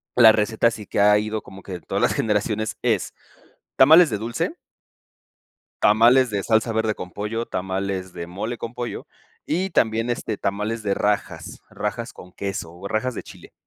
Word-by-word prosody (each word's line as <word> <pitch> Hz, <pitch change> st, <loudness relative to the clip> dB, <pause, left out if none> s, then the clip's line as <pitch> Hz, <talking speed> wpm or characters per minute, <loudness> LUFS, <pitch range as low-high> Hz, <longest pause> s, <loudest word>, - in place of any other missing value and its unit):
la 115 Hz, -3 st, +9 dB
receta 110 Hz, +2 st, +2 dB
sí 110 Hz, -2 st, -8 dB
que -, -, -3 dB
ha 105 Hz, +1 st, +6 dB
ido 110 Hz, +1 st, -2 dB
como 95 Hz, 0 st, -13 dB
que 90 Hz, -3 st, -6 dB
todas -, -, -3 dB
las -, -, +3 dB
generaciones, 105 Hz, 0 st, -1 dB
es -, -, 0 dB, 0.6 s
tamales 160 Hz, +5 st, +7 dB
de 105 Hz, -, -2 dB
dulce 115 Hz, +2 st, -3 dB, 1.3 s
tamales 120 Hz, +4 st, +5 dB
de 100 Hz, -2 st, -1 dB
salsa 110 Hz, +2 st, +1 dB
verde 110 Hz, -1 st, 0 dB
con 90 Hz, -2 st, -8 dB
pollo, 110 Hz, +3 st, -3 dB
tamales 95 Hz, -1 st, -3 dB
de 85 Hz, -, -6 dB
mole 105 Hz, +7 st, -4 dB
con 115 Hz, -, -6 dB
pollo, 120 Hz, -1 st, -5 dB, 0.4 s
y 185 Hz, +5 st, -1 dB
también, 115 Hz, -6 st, +1 dB
este, 115 Hz, -3 st, -3 dB
tamales 105 Hz, +3 st, -2 dB
de 100 Hz, -1 st, 0 dB
rajas, 105 Hz, 0 st, -2 dB
rajas -, -, -4 dB
con 90 Hz, -, -14 dB
queso 95 Hz, -4 st, -5 dB
o 90 Hz, +3 st, -8 dB
rajas 125 Hz, +4 st, -1 dB
de -, -, -5 dB
chile. -, -, -14 dB
110 Hz, 170 wpm, -23 LUFS, 100-115 Hz, 1.3 s, la